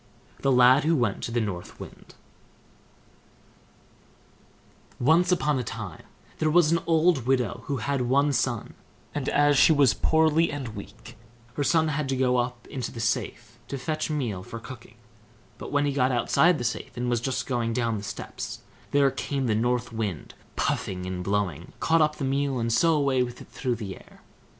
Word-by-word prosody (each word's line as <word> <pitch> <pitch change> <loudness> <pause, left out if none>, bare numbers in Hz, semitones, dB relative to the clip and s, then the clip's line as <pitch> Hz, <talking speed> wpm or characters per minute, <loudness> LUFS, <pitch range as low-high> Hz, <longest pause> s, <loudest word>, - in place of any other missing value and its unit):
THE 135 - +1
LAD 125 +2 +6
WHO 165 +2 +2
WENT 120 -8 0
TO - - -3
THE 120 0 0
NORTH 95 -5 -5
WIND - - -12 2.8
Once 165 +8 +4
on 150 -6 +1
a - - -2
time 110 -8 -7 0.3
there 155 - +2
was 165 0 +4
an 170 - +3
old 160 -6 +3
widow 125 -2 0
who 140 - -1
had 135 +3 -1
one 140 +4 +2
son; 120 -2 -1 0.4
and 145 -3 -2
as 145 -1 +3
she - - +7
was 140 -6 +5
poorly 160 +1 +3
and 140 -5 -5
weak, 105 -2 -11 0.4
her 145 - -1
son 160 +2 +2
had 145 -2 -2
to 135 - 0
go 125 -1 +2
up 120 0 -2
into 130 -3 -5
the 115 - -8
safe 115 0 -3
to 140 - -4
fetch 155 +4 -3
meal 120 -11 -2
for 115 - -8
cooking; - - -11 0.6
but - - -7
when 145 0 +2
he 145 - +1
got 130 -1 +2
outside 155 +7 +3
the 120 - -4
safe, 115 +1 -4
and 125 +1 -2
was 120 -2 0
just 130 +1 -2
going 120 -3 -1
down 115 -2 -1
the - - -9
steps, - - -6 0.3
there 140 -1 +3
came 135 0 -3
the 115 - +1
North 120 +2 0
Wind, 105 -8 -4 0.2
puffing 90 -1 -2
and 90 -1 -4
blowing, 95 -5 -2
caught 165 0 +3
up 150 0 +2
the 140 - -3
meal, 135 0 0
and 115 -1 0
so 165 +7 +4
away 140 -3 +2
with 120 -1 -3
it - - -13
through 125 -3 -2
the 100 -5 -6
air. - - -18
130 Hz, 185 wpm, -26 LUFS, 115-145 Hz, 2.8 s, she